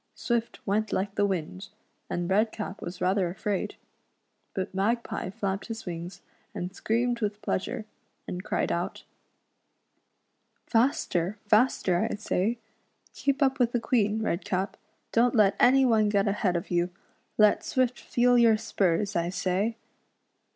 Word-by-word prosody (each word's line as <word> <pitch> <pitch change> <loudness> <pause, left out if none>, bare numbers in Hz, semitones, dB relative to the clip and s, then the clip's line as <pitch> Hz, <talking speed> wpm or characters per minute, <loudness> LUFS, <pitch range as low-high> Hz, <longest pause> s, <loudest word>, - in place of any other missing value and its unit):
Swift 235 -1 -2
went 215 +1 0
like 195 +1 -1
the 205 0 +2
wind, 155 - -4 0.4
and 175 0 -2
Redcap 210 +1 0
was 175 +1 -7
rather 185 -1 +2
afraid, 195 +2 -3 0.8
but 190 0 -3
Magpie 220 +1 -1
flapped 195 -1 -3
his 225 -1 -6
wings, 175 0 -6 0.3
and 180 +2 -5
screamed 235 +3 0
with 210 -1 -1
pleasure, 220 +3 -2 0.4
and 180 +1 -5
cried 215 - -1
out: 170 +1 -3 0.8
" - - -47
Faster! 215 -6 +1
faster! 210 -5 +3
I - - -1
say. 210 +2 -1 0.6
Keep 280 +1 +1
up 265 -1 +1
with 240 -1 +2
the 240 - +2
Queen, 220 -2 +1
Redcap 195 0 -1
I - - -36 0.3
Don't 240 +2 +3
let 205 -3 +5
any 265 +2 +6
one 220 -4 +3
get 200 0 +2
ahead 200 -2 +1
of 170 +2 -3
you. 175 0 +1 0.5
Let 210 -1 +5
Swift 255 -5 0
feel 245 0 +3
your 230 -2 +5
spurs, 200 -3 0
I 170 0 +1
say." 190 +4 -1
210 Hz, 145 wpm, -28 LUFS, 185-230 Hz, 0.8 s, any